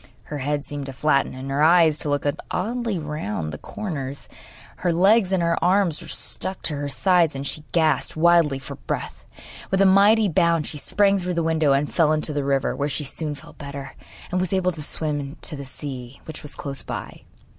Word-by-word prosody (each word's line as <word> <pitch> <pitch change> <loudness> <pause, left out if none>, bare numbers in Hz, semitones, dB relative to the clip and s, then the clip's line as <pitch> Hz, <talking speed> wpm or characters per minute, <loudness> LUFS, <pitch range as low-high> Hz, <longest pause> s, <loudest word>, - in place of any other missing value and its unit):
Her 150 - -6
head 145 +1 -1
seemed 145 -1 -6
to 135 - -6
flatten, 140 -1 +1
and 135 +1 -6
her 140 +2 0
eyes 160 -1 +5
to 150 - -2
look 145 0 0 0.2
oddly 230 +1 -1
round 105 - -4
the 75 - -7
corners; 140 -9 -5 0.5
her 175 - 0
legs 195 +3 +4
and 185 -3 +2
her 170 0 +1
arms 180 -3 +2
were - - -10
stuck 190 0 -4
to 150 - -2
her 145 0 -3
sides, 170 0 +3
and 135 +1 -4
she 150 +2 -2
gasped 160 -2 +2
wildly 165 -3 +4
for 135 - -8
breath. - - -5 0.5
With 190 - +1
a 195 - +6
mighty 205 +3 +6
bound 170 -2 +2
she 150 - -3
sprang 200 +4 +2
through 180 -1 -3
the 170 - +1
window 160 -3 +3
and 140 +1 0
fell 155 -3 +4
into 155 0 0
the 145 -1 -1
river, 135 -1 +1
where 145 +1 -1
she 150 - -2
soon 150 +2 -3
felt - - -15
better, 140 -2 -7 0.4
and 180 0 +1
was 185 0 -1
able 185 -1 +2
to 160 -3 -6
swim 145 -1 -3
to 155 - -1
the 140 -1 -7
sea, 130 -2 -7
which 155 -1 -8
was 150 - -4
close 140 -2 -5
by. - - -7
155 Hz, 210 wpm, -23 LUFS, 140-180 Hz, 0.5 s, a